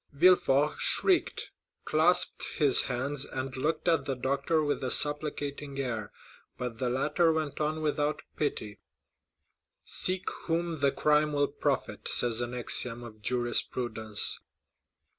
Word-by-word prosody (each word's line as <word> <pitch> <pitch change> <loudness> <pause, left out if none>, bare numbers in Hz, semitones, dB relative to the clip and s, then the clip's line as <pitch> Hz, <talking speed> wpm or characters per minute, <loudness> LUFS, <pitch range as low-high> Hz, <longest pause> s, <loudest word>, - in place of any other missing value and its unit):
40120m - - -18
Villefort 150 -5 +3
shrieked, 370 -3 +4 0.4
clasped 165 +4 +1
his 145 -5 +5
hands, 135 +3 -2
and 130 -1 -5
looked 150 +7 -2
at 165 -1 +2
the 135 - -2
doctor 140 +5 0
with 145 -2 -2
a 130 - -1
supplicating 145 -1 -1
air. 115 -6 -4 0.5
But 125 -2 -5
the 125 - -1
latter 150 +6 +1
went 155 -3 -3
on 155 +1 -2
without 150 0 -1
pity: 110 -8 -3 1.1
"'Seek 185 0 +2 0.2
whom 165 -1 -2
the 140 -1 +2
crime 150 +1 +1
will 145 -1 +1
profit,' 140 - -3
says 120 -1 +2
an 120 +1 -4
axiom 120 0 +1
of 110 -3 -12
jurisprudence." 120 -2 -1
140 Hz, 130 wpm, -29 LUFS, 125-155 Hz, 1.1 s, his